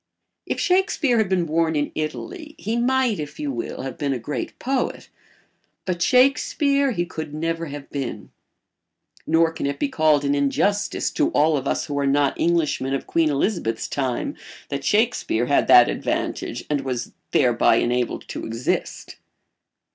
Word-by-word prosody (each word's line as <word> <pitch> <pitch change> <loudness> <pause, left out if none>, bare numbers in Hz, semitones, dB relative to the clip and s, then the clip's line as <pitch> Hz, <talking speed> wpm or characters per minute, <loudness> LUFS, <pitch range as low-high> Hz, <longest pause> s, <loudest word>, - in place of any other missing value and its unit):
If - - -2
Shakespeare 360 - +2
had 215 -4 +1
been 185 -3 +1
born 160 0 +1
in 145 -1 0
Italy 305 - -5
he 220 +3 -3
might, 245 -3 +1
if 150 0 -7
you 145 -2 -2
will, 120 0 -5
have 135 -1 -6
been 140 -2 0
a - - -2
great 125 +5 -5
poet, 265 0 -2 0.8
but 175 -2 -2
Shakespeare 275 - +3
he 175 -8 -1
could 155 -3 -6
never 165 +1 -2
have 145 -1 -8
been. 135 -4 -5 1.0
Nor 165 +1 +3
can 165 - -3
it 140 - -2
be 290 - -1
called 155 - +2
an 140 - +2
injustice 145 +9 0
to 310 0 +1
all 155 +1 +3
of 135 -1 -2
us - - 0
who 145 -1 -3
are 140 - +1
not 140 0 +2
Englishmen 155 -5 +1
of 135 - -4
Queen 165 -2 +2
Elizabeth's 140 - -1
time 130 -4 -2 0.3
that 140 0 -3
Shakespeare 210 - +1
had 140 - +2
that - - +8
advantage - - -3
and 145 -2 0
was 130 -3 -4 0.2
thereby - - +3
enabled 125 0 -1
to - - -5
exist. 115 +2 -3
155 Hz, 160 wpm, -23 LUFS, 140-215 Hz, 1.0 s, that